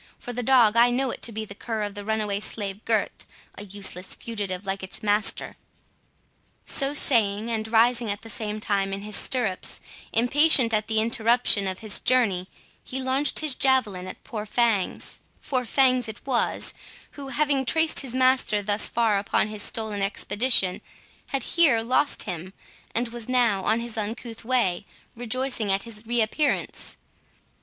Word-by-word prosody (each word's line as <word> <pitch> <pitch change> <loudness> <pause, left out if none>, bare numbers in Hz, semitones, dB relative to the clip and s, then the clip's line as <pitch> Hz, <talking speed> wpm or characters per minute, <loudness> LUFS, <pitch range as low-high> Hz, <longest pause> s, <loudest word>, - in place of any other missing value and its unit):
For 245 - -7
the 245 - -2
dog, 235 -3 +5
I 235 +1 +6
know 255 +1 0
it - - -8
to 235 - -3
be 220 0 -4
the 200 - -10
cur 220 +1 -4
of 205 -1 -4
the 205 - -7
runaway 210 -1 -1
slave 205 -1 -5
Gurth, 220 -3 0 0.3
a 205 - -9
useless 190 -2 -5
fugitive 205 -4 -5
like 195 0 -3
its 190 +2 -10
master." 210 0 +1 1.1
So 275 +1 +1
saying, 225 -5 +1
and 220 -1 -2
rising 230 +1 +3
at 200 0 -2
the 225 - -11
same 215 0 -4
time 195 -2 -1
in 200 +1 -5
his 210 0 -3
stirrups, 230 -8 -1 0.3
impatient 255 0 +4
at 215 0 +1
the 220 -1 +1
interruption 230 -2 +2
of 190 0 -3
his 215 -3 0
journey, 200 -8 +2 0.4
he 265 - -5
launched 265 +3 +1
his 305 -3 0
javelin 235 -10 +1
at - - -9
poor 215 -2 -6
Fangs—for 235 +3 -1
Fangs 255 -1 +3
it 220 - -9
was, 255 -3 0 0.4
who, 280 -1 -8
having 275 0 +1
traced 320 +5 +2
his 260 -3 -4
master 255 -5 +3
thus 205 +1 +2
far 225 -4 +2
upon 205 +1 0
his 210 -1 -5
stolen 215 -2 -3
expedition, 200 0 0 0.5
had 275 -3 -2
here 280 -10 +3
lost 260 +5 +1
him, 180 0 -6 0.4
and 235 +1 0
was 235 0 -8
now, 235 -6 +2
in 220 +2 +3
his 235 -1 -5
uncouth 225 +2 -5
way, 230 -7 +1 0.3
rejoicing 245 -2 -2
at 195 +1 +1
his 225 -1 -11
reappearance. 240 +5 -1
225 Hz, 165 wpm, -25 LUFS, 205-250 Hz, 1.1 s, I